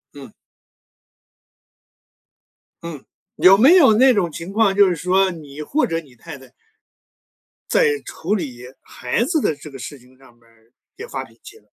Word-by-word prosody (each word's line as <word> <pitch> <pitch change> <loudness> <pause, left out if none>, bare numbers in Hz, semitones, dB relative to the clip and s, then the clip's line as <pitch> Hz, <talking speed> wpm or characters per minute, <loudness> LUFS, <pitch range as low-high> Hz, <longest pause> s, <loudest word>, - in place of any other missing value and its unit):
嗯。 135 -6 -12 2.5
嗯， 160 -5 -8 0.4
有 190 +1 +6
没 270 - +6
有 275 -12 +6
那 255 +4 +5
种 195 -6 0
情 165 +5 -8
况， 205 -2 +1
就 200 -1 +5
是 175 - -1
说 185 +3 +1
你 150 -3 -11
或 290 - -1
者 165 0 -3
你 135 -6 -21
太 145 +5 -11
太 130 -2 -18 1.2
在 455 -3 +2
处 195 +6 -3
理 130 - -6 0.2
孩 125 - -3
子 315 +5 0
的 160 - -1
这 145 +2 -12
个 135 - -11
事 140 +4 -8
情 125 +1 -23
上 135 -3 -21
面 120 - -31
儿， 115 0 -29 0.3
也 455 - -9
发 - - -6
脾 - - -20
气 420 - -14
了。 - - -25
170 Hz, 185 characters per minute, -19 LUFS, 135-220 Hz, 2.5 s, 有